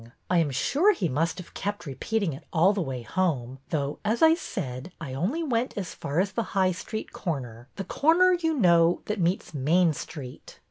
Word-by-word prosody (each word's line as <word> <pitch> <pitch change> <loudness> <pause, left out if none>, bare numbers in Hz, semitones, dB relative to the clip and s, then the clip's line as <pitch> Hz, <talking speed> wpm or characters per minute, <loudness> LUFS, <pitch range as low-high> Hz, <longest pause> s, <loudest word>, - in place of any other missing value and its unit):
I 180 - +4
am 160 -3 +2
sure 295 - +3
he 180 - -1
must 160 +3 0
have 180 - -10
kept 205 -1 -4
repeating 165 - -1
it 135 - -10
all 180 +4 +4
the 200 - -1
way 130 -6 -4
home, 135 -4 -1
though, 145 -2 -2
as 220 +6 +1
I 320 0 +8
said, 160 - -5
I 145 -6 -6
only 205 - -1
went 250 -5 -1
as 190 -4 -4
far 145 +4 -2
as 195 +1 +1
the 230 - -1 0.2
High 185 -1 +4
Street 215 +4 -6
corner, 125 - -4
— - - -43
the 195 - -4
corner, 340 - +4
you 325 -2 0
know, 170 - +4
that 210 -2 -2
meets 175 0 0
Main 160 +4 +3
Street." 135 -3 -9
175 Hz, 200 wpm, -27 LUFS, 140-215 Hz, 0.2 s, I